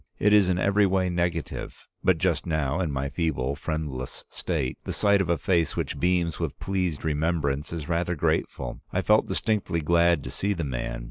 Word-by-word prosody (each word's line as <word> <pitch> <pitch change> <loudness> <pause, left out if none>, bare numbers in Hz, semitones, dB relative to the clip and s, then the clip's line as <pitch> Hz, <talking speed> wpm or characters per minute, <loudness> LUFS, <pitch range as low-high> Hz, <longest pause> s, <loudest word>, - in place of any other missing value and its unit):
It 105 0 +3
is 100 -3 +6
in 90 - +2
every 100 +2 +3
way 95 -1 +1
negative. 85 -2 -3 0.2
But - - +4
just - - 0
now, 80 -1 0
in 85 -5 0
my 70 0 -2
feeble, 70 -3 -1
friendless 75 -5 -4
state, 65 -1 -2
the - - -4
sight 100 -1 +4
of 90 - -2
a 85 - +3
face 85 -3 +1
which - - -3
beams 90 -3 +1
with - - -3
pleased 90 -6 -2
remembrance 75 -2 0
is 80 -3 -5
rather 85 +1 0
grateful. 75 - -1
I - - 0
felt - - +4
distinctly 105 -6 0
glad 85 -1 +3
to - - -6
see 100 +1 0
the 85 -4 -3
man. 65 -4 -3
85 Hz, 190 wpm, -26 LUFS, 75-90 Hz, 0.2 s, is